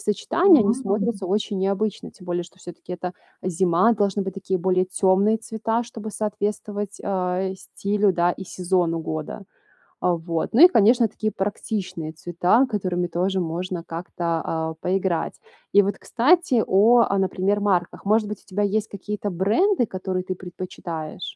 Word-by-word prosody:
сочетания, 330 - +4
они 210 +3 +3
смотрятся 205 -3 -1
очень 205 +1 -1
необычно, 200 +2 -1
тем 180 - -16
более, 175 0 -1
что 180 +2 -18
всё-таки 175 0 -10
это 180 0 -5 0.3
зима, 185 +4 +3
должны 205 -1 0
быть 190 -1 -5
такие 190 -1 -2
более 185 +1 +2
темные 195 +3 +2
цвета, 225 +1 -2
чтобы 225 -2 -8
соответствовать, 205 -1 -3
э, 190 0 -1
стилю, 200 +1 0
да, 175 0 +2
и 190 - -8
сезону 175 -2 0
года. 155 +5 -5 0.6
Э, 180 - +3
вот. 165 +1 -3
Ну 265 - +7
и 360 - +10
конечно, 235 - +4
такие 215 0 -3
практичные 190 -4 -3
цвета, 175 - +2
которыми 185 -6 -1
тоже 185 +3 0
можно 175 +1 -3
как-то, 170 +1 -6 0.2
а, 160 0 -2
поиграть. 185 -3 -1 0.3
И, 205 - +7
вот, 200 +1 -2
кстати 260 -2 +2
о, 220 +6 +5
а, 195 - +1
например, 190 +2 0
марках. 185 -4 0
Может 215 +1 +3
быть, 210 -1 -6
у - - -31
тебя 205 +1 -1
есть 210 +2 0
какие-то 205 +1 -5
бренды, 230 - +2
которые 185 -1 -3
ты 185 - -3
предпочитаешь? 175 -2 -7
195 Hz, 155 wpm, -23 LUFS, 180-210 Hz, 0.6 s, и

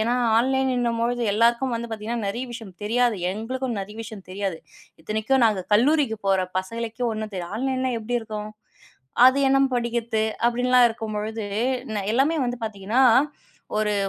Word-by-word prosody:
ஏன்னா 235 +3 +1 0.2
ஆன்லைன்னுன்னும் 250 -2 +1
பொழுது 245 +1 0
எல்லாருக்கும் 235 +4 +2
வந்து 230 0 -4
நெறைய 235 +6 -2
விஷயம் 225 -4 -8
தெரியாது. 235 +1 +2
எங்களுக்கும் 245 +4 -3
நெறைய 210 +2 -8
விஷயம் 215 -3 -9
தெரியாது. 195 -3 -3 0.4
இத்தனைக்கும், 220 +8 0
நாங்க 210 -5 +2
கல்லூரிக்கு 260 -1 +3
போற 190 -1 +3 0.2
பசங்களுக்கே 230 +5 -4
ஒண்ணும் 215 -1 -4
தெரியல. 175 -2 -5
ஆன்லைன்லாம் 260 0 -1
எப்டி 240 +3 -2
இருக்கும்? 215 -1 -6 0.8
அது 260 +2 +4
என்னம் 270 0 +3
படிக்கிற்து 235 -2 -1 0.2
அப்டின்லா 250 +1 +3
இருக்கும்பொழுது 220 -1 -4 0.4
என்ன 215 -4 -3
எல்லாமே 285 +6 +2
வந்து 245 0 -3
பாத்தீங்கன்னா 215 +4 0 0.8
ஒரு 210 -1 +1
230 Hz, 135 wpm, -24 LUFS, 215-245 Hz, 0.8 s, அது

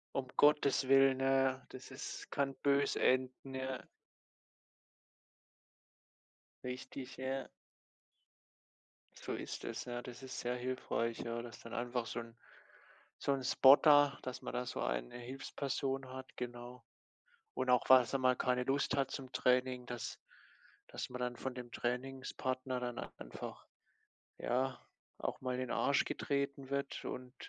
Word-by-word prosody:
Um 135 -1 0
Gottes 145 -2 +5
Willen, 135 -1 +6
ja 135 0 +4
ja, 130 -1 -13
das 130 +1 -10
ist 130 - -7
kann 140 -1 0
böse 140 +1 +2
enden, 130 +1 +1
ja. 130 0 -2 2.9
Richtig, 130 +1 -6
ja. 130 +1 -3 1.7
So - - -5
ist - - -5
es, - - -4
ja. 120 0 -4
Das 125 +1 -9
ist 130 - -6
sehr 125 +1 -1
hilfreich, 125 -2 -1
ja, 115 0 -3
dass 115 -4 -9
dann 115 - -8
einfach 120 -1 -1
so 120 - -3
'n 115 0 -11 0.8
so 140 - +1
'n 135 -1 0
Spotter, 145 +2 +7
dass 130 -1 -5
man - - -5
da 125 - 0
so - - -3
eine - - -2
Hilfsperson 135 +1 -3
hat, 130 0 -9
genau. 120 0 -6 0.7
Und 130 0 0
auch, 125 - +5
falls 130 -2 +7
man 135 - +1
mal 130 -1 +5
keine 125 0 +1
Lust 140 +1 +1
hat 135 -1 +1
zum 130 -1 -6
Training, 125 0 +2
dass 120 -3 -5 0.7
dass - - -5
man 125 0 -5
dann 125 -1 -1
von 130 -1 -4
dem 125 -1 -7
Trainingspartner 130 0 -2
dann 120 -1 -3 0.2
einfach, - - -8 0.7
ja, 130 +2 0 0.4
auch - - -3
mal 130 -1 -1
in 125 - -2
den 130 - -3
Arsch 140 - +3
getreten 140 -1 -2
wird 140 0 -2
und 125 +1 -6
130 Hz, 145 wpm, -36 LUFS, 125-135 Hz, 2.9 s, Spotter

